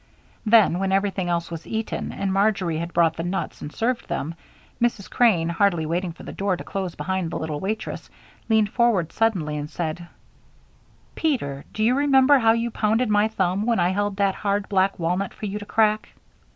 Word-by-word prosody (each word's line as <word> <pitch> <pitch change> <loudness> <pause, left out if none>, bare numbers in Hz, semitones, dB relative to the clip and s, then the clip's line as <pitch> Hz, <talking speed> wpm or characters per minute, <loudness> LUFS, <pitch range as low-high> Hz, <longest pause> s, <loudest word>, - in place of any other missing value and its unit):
Then, 215 -5 +5
when 195 0 0
everything 195 -2 0
else 170 0 -1
was 165 0 -7
eaten, 220 0 -3
and 195 -1 -2
Marjory 195 -5 +1
had 170 +1 -4
brought 165 -2 +2
the 165 - -3
nuts 185 +3 -3
and 145 - -6
served 235 +5 -1
them, 170 -2 -3 0.5
Mrs. 235 -5 0
Crane, 200 -9 +3
hardly 170 -1 +1
waiting 175 +3 -1
for 165 - -13
the - - -7
door 195 -2 -1
to - - -7
close 190 -3 -4
behind 190 -3 -2
the - - -4
little 155 -2 -3
waitress, 215 +5 -4 0.4
leaned 215 -2 +3
forward 225 -9 +2
suddenly 185 -10 0
and 145 0 -5
said: 170 +1 -4 1.1
"Peter, 180 - -1
do 215 - -2
you 235 +3 +4
remember 275 0 +5
how 225 -2 +5
you 230 +1 -1
pounded 220 +2 +1
my 210 0 +3
thumb 195 -2 0
when 235 -1 +2
I 175 - +3
held 205 +1 -1
that 200 -1 +2
hard 200 0 -1
black 195 0 +2
walnut 180 +3 -1
for - - -6
you 205 +1 -3
to 205 - -10
crack?" 215 -1 +2
195 Hz, 190 wpm, -23 LUFS, 175-220 Hz, 1.1 s, Then